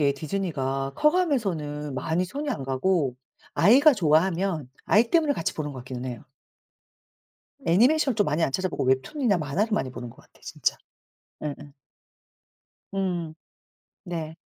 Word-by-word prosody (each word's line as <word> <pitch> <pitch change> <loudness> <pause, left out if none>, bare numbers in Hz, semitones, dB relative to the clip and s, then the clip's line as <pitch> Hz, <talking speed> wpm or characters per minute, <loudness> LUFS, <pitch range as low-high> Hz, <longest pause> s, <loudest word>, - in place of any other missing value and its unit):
이상하게 140 -1 +3
디즈니가 140 -4 -2
커 300 - +4
가면서는 175 - -1
많이 160 +7 0
손이 285 +10 -4
안 210 - -3
가고 135 0 +1 0.4
아이가 280 +8 +6
좋아하면 165 - +1 0.2
아이 230 +3 +3
때문에 315 -4 +3
같이 165 - -2
보는 150 -2 -4
것 130 - -8
같기는 125 0 -7
해요. 120 -3 -6 1.4
애니메이션 250 - +4
좀 205 - +3
많이 150 +3 0
안 - - +2
찾아보고 185 -5 -1
웹툰이나 195 - +1
만화를 175 +9 -1
많이 135 -11 0
보는 120 -2 -7
것 - - -17
같아 - - -26
진짜. - - -1 0.7
예예. 145 -2 -3 1.4
음 175 -5 -2 0.7
네. 165 -3 -5
165 Hz, 310 characters per minute, -26 LUFS, 140-210 Hz, 1.4 s, 아이가